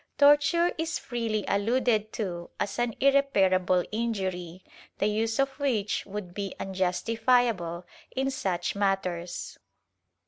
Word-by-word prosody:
Torture 295 +4 +5
is 325 0 -1
freely 225 -4 -2
alluded 220 +1 +1
to 175 -5 -4
as 200 +2 -2
an 240 -2 0
irreparable 190 -10 +3
injury 190 -6 -3 0.3
the - - 0
use 220 +2 0
of 275 0 +2
which 230 -8 0
would 200 -3 -6
be 200 -1 -4
unjustifiable 195 -1 +1 0.2
in 270 +1 -1
such 185 -9 -2
matters. 190 -3 -2
210 Hz, 110 wpm, -28 LUFS, 185-245 Hz, 0.3 s, Torture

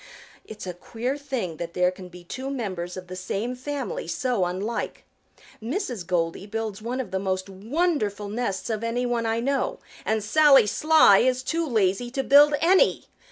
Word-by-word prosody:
It's 215 -2 -9
a 180 - -4
queer 235 +9 -4
thing 260 - -4
that 170 +1 -6
there 180 0 +3
can 185 0 -11
be 180 0 -13
two 260 +9 -6
members 185 -9 -4
of 185 - -7
the 180 +1 -8
same 195 +6 -3
family 290 - -4
so 250 -9 0
unlike. 195 +6 -3 0.6
Mrs. 240 - -3
Goldy 175 +2 -1
builds 220 -1 -4
one 240 +4 -3
of 250 -7 -4
the 190 - -1
most 190 0 -2
wonderful 210 - -1
nests 215 0 -3
of 220 0 -3
any 235 +2 -1
one 235 -2 0
I 225 +1 0
know, 280 - -1 0.3
and 220 -1 0
Sally 290 +2 +6
Sly 305 -2 +5
is 255 +1 +1
too 330 +4 -1
lazy 220 -1 +1
to 270 - -1
build 290 +2 +6
any. 375 +8 +4
225 Hz, 175 wpm, -25 LUFS, 190-270 Hz, 0.6 s, Sally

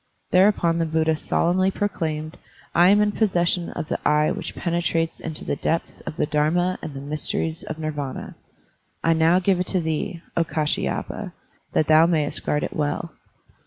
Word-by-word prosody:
Thereupon 180 -3 +4
the 165 - +1
Buddha 160 0 +1
solemnly 180 +4 +1
proclaimed, 160 -6 -3 0.4
"I 175 +1 +6
am 205 +1 +5
in 210 0 +2
possession 175 -5 +1
of - - -5
the - - -2
Eye 150 0 +3
which - - -5
penetrates 170 -1 -1
into 160 -2 -4
the - - -1
depths 165 +4 -2
of 155 - -5
the - - +2
Dharma 165 +5 +1
and 145 - -7
the 135 - -6
mysteries 155 +2 -2
of 155 - -6
Nirvana. 150 -4 -4 0.7
I 165 - +4
now 165 +2 +4
give 185 0 +2
it 180 - -1
to 185 - +1
thee, 165 +1 -3
O 170 - +3
Kdshyapa, 155 -2 -2 0.4
that 155 - +3
thou 155 +2 +6
mayest 155 -4 0
guard 150 - 0
it - - -4
well." 150 +2 -2
165 Hz, 170 wpm, -23 LUFS, 155-175 Hz, 0.7 s, I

